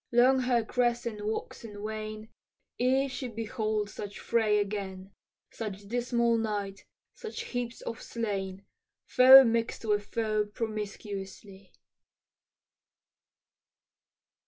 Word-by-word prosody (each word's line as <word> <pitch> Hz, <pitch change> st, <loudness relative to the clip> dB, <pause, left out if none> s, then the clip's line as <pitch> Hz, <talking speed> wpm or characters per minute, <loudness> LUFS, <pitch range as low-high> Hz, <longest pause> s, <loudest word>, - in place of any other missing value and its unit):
long 250 Hz, +2 st, +5 dB
her 245 Hz, -3 st, +1 dB
crescent 240 Hz, -3 st, -1 dB
wax 220 Hz, +2 st, -4 dB
and 210 Hz, -3 st, -9 dB
wane 215 Hz, 0 st, -5 dB, 0.5 s
Ere 265 Hz, +2 st, +3 dB
she 255 Hz, 0 st, -5 dB
behold 215 Hz, -2 st, -2 dB
such 205 Hz, 0 st, -8 dB
fray 220 Hz, -3 st, +2 dB
again, 195 Hz, -2 st, -3 dB, 0.4 s
Such 205 Hz, -3 st, -6 dB
dismal 235 Hz, 0 st, +1 dB
night, 205 Hz, -3 st, -3 dB, 0.3 s
such 445 Hz, -, -7 dB
heaps 245 Hz, -1 st, -4 dB
of 230 Hz, -, -6 dB
slain, 195 Hz, -4 st, -4 dB, 0.4 s
Foe 260 Hz, +1 st, +9 dB
mix'd 230 Hz, -1 st, -1 dB
with 205 Hz, -1 st, 0 dB
foe 215 Hz, -2 st, 0 dB
promiscuously. 200 Hz, -3 st, -6 dB
220 Hz, 100 wpm, -29 LUFS, 205-235 Hz, 0.5 s, Foe